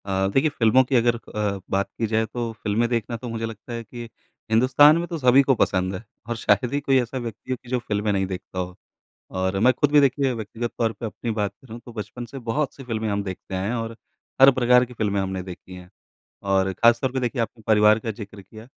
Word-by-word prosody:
अ, 95 -1 0
देखिए 150 +4 +3
फ़िल्मों 130 -2 +4
की 130 +1 -1
अगर 120 0 +3
अ, 105 -3 -3
बात 100 0 0
की 115 - +1
जाए 110 +1 +1
तो 115 +1 -4
फ़िल्में 110 +3 +1
देखना 115 -1 -2
तो 120 +1 -7
मुझे 115 0 -3
लगता 115 +1 -8
है 115 0 -4
कि 120 +1 -9 0.5
हिन्दुस्तान 130 +7 +6
में 170 +1 -2
तो 170 - -4
सभी 130 -1 +5
को 135 -1 +3
पसंद 95 -3 0
है 90 - -7 0.3
और 120 - -1
शायद 115 +3 +1
ही 145 - +1
कोई 135 -1 +3
ऐसा 120 +2 -5
व्यक्ति 120 0 -6
हो 130 - 0
कि 120 - -14
जो 125 0 0
फ़िल्में 105 -2 -1
नहीं 95 -1 +1
देखता 95 0 -6
हो। 90 0 -4 0.6
और 95 +1 -1
मैं 125 +4 +5
खुद 145 +3 +1
भी 150 - +7
देखिए 140 -1 +2
व्यक्तिगत 115 +1 -5
तौर 115 -1 +1
पे 115 - -6
अपनी 115 +2 -5
बात 105 -2 -1
करूँ 115 -2 -9
तो 120 - -11
बचपन 110 +2 -6
से 135 +4 -9
बहुत-सी 135 +4 -3
फ़िल्में 110 -2 -3
हम 100 -1 -1
देखते 95 0 -7
आए 95 +1 -2
हैं 120 - -1
और 115 -1 -4 0.4
हर 135 +1 +10
प्रकार 125 0 +4
की 125 0 -13
फ़िल्में 100 -3 0
हमने 95 -1 -3
देखी 90 0 -10
हैं। 90 -1 -12 0.5
और 95 -1 +1
खासतौर 115 +6 +3
पे 130 - -1
देखिए 125 0 -1
आपने 115 0 -6
परिवार 105 0 +5
का 115 0 -4
ज़िक्र 100 -2 -9
किया, 110 +4 -13
115 Hz, 235 wpm, -23 LUFS, 100-125 Hz, 0.6 s, हर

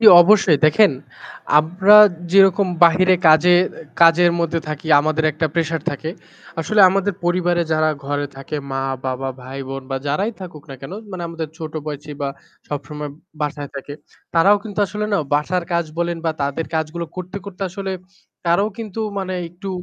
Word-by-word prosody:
জ্বি 225 - +9
অবশ্যই। 190 -5 +4
দেখেন 205 +6 +5 0.7
আমরা 185 +7 +5 0.4
যেরকম 195 0 +5 0.2
বাহিরে 185 +2 +4
কাজের 175 +3 +5 0.4
কাজের 170 +1 +6
মধ্যে 165 0 -1
থাকি 155 +1 -6
আমাদের 155 +1 -1
একটা 155 +2 -1
প্রেশার 165 -1 -1
থাকে 155 +2 -5 0.5
আসলে 210 +6 +1
আমাদের 195 +1 0
পরিবারে 175 0 +1
যারা 155 0 +2 0.2
ঘরে 145 0 -2
থাকে 135 +3 -6
মা-বাবা 135 0 -3
ভাই-বোন 135 +1 -7
বা 135 - -1
যারাই 190 +11 -1
থাকুক 175 -5 -9
না - - -7
কেন 135 +7 -9 0.2
মানে 185 -2 -6
আমাদের 165 -1 -5
ছোটো 155 -1 -5
বয়সি 150 0 -6
বা 140 - -1 0.4
সবসময় 150 +1 -6 0.3
বাসায় 145 -1 -4
থাকে 145 +1 -7 0.4
তারাও 195 +5 +5
কিন্তু 210 -2 -8
আসলে 210 +3 -4
না 200 - +3 0.2
বাসার 170 +4 0
কাজ 170 0 +1
বলেন 170 0 -1
বা 165 - +1
তাদের 140 +3 -2
কাজগুলো 160 +2 -3
করতে, 185 +1 -6
করতে 200 -1 -8
আসলে 190 +1 -5 0.5
তারাও 175 +5 +2
কিন্তু 225 -1 -6 0.2
মানে 185 -1 -3
একটু 180 +4 -9
165 Hz, 155 wpm, -20 LUFS, 150-185 Hz, 0.7 s, জ্বি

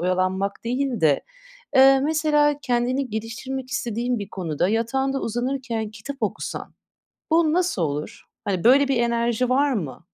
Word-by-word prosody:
oyalanmak 185 +3 -1
değil 250 0 -1
de, 150 -3 +4 0.6
eee, 270 0 +7
mesela 295 0 +2
kendini 250 +2 0
geliştirmek 255 +4 -5
istediğin 240 0 -1
bir 200 -1 -6
konuda 175 -2 -1
yatağında 265 +5 0
uzanırken 240 -2 -2
kitap 225 +6 -8
okusan - - -4 0.6
bu 320 -1 +4
nasıl 360 - +1
olur? 150 -1 -3 0.2
Hani, 190 -4 -2
böyle 270 +4 +6
bir 270 - +1
enerji 235 +1 +1
var 280 +2 +3
mı? 160 - -4
240 Hz, 135 wpm, -23 LUFS, 205-270 Hz, 0.6 s, eee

